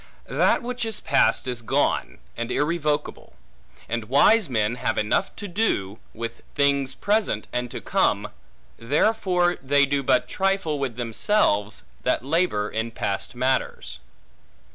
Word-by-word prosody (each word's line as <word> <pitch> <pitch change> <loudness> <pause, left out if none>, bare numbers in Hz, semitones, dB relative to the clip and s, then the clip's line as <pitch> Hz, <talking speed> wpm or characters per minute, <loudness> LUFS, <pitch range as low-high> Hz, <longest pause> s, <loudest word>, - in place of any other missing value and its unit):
That - - +2
which 245 0 -3
is 225 -2 -2
past - - +2
is 125 -2 -3
gone, 115 - 0 0.2
and 120 +1 -4
irrevocable; 150 0 -1 0.5
and 115 -1 -4
wise 190 - +5
men 110 -2 +1
have - - -1
enough 105 - 0
to 205 - -7
do, 170 - -1
with 115 +1 -6
things 140 -2 +2
present 205 - 0
and 125 0 -2
to - - -7
come; - - +1 0.5
therefore 180 - +1
they 140 +1 +3
do 140 0 0
but 135 - +2
trifle 195 -6 0
with 130 -4 -2
themselves, 115 - 0 0.2
that - - 0
labor 145 -9 +1
in 110 +2 -3
past 100 0 -3
matters. 130 +1 -1
140 Hz, 135 wpm, -24 LUFS, 115-180 Hz, 0.5 s, wise